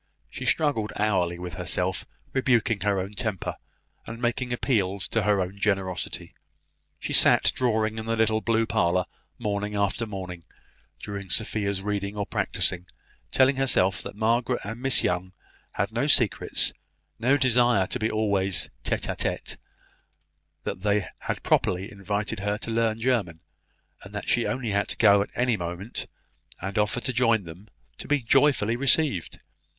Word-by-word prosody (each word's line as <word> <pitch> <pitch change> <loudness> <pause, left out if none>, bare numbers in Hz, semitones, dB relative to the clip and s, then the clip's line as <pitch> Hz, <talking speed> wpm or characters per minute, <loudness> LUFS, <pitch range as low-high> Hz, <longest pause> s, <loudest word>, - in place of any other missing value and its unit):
She - - -6
struggled 140 -9 +1
hourly 95 -5 +1
with 90 -1 -6
herself, 90 +2 -2 0.3
rebuking 120 -5 +2
her 100 -2 +1
own 95 +3 -4
temper, 105 -4 -3 0.5
and 115 +1 -7
making 120 +1 -1
appeals 100 -7 0
to 115 - +1
her 105 -1 +2
own 95 +2 -3
generosity. 95 -3 -2 0.7
She - - -4
sat - - +6
drawing 110 -3 0
in 110 - -6
the 115 - +1
little 110 -1 +2
blue 115 0 +2
parlour, 90 -5 +1 0.3
morning 105 -2 -2
after 100 +3 0
morning, 90 -4 -7 0.6
during 100 -2 -6
Sophia's 100 -1 0
reading 100 0 -3
or 100 - -1
practising, 90 -2 0 0.4
telling 130 +1 +4
herself 105 -8 +2
that - - -7
Margaret 115 +3 +1
and 115 +4 -6
Miss 130 -5 +3
Young 90 +1 -1 0.4
had - - -1
no - - 0
secrets, - - +3 0.5
no 135 +5 +3
desire 120 -6 +3
to - - -3
be 110 - 0
always 100 -4 +1
tete - - -1
a - - -2
tete; - - -3 1.1
that 95 - -4
they 105 -1 +1
had - - -4
properly 95 +5 +1
invited 105 +2 -3
her 105 +1 -1
to 115 +1 -5
learn 115 -1 +1
German; 115 -9 0 0.6
and - - -12
that - - -5
she - - +3
had - - 0
only 125 -4 -3
to 100 0 0
go 100 -2 +6
at 100 - -3
any 125 -1 +2
moment, 90 +4 -5 0.5
and 95 +3 -3
offer 105 +4 0
to 130 - -2
join 115 -4 +3
them, 85 +5 -11 0.3
to - - -6
be 145 -3 +1
joyfully 130 -3 +3
received. 135 - +1
105 Hz, 155 wpm, -26 LUFS, 95-115 Hz, 1.1 s, sat